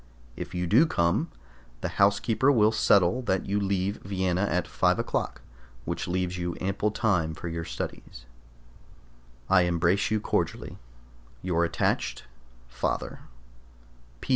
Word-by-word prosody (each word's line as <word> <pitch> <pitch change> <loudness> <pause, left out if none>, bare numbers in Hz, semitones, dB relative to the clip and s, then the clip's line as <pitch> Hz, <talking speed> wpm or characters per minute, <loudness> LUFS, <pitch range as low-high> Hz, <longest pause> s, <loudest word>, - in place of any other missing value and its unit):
If - - -7
you 90 0 -1
do 120 - +5
come, 95 - +1 0.5
the - - -1
housekeeper 110 +6 +3
will 110 -5 +4
settle 100 +1 +3
that 95 0 +1
you 100 +1 0
leave 100 0 -1
Vienna 95 0 -1
at 90 0 0
five - - +2
o'clock, - - -2 0.4
which - - -3
leaves 90 0 -1
you 85 0 -3
ample 100 +3 0
time 90 -7 0
for 90 - -7
your 85 0 -4
studies. - - -7 1.2
I 95 -1 +5
embrace 85 +2 +2
you 110 0 +1
cordially. - - -2 0.6
Your 85 -2 +1
attached 85 - -1 0.4
FATHER. 65 +2 -3
95 Hz, 125 wpm, -27 LUFS, 85-105 Hz, 1.2 s, do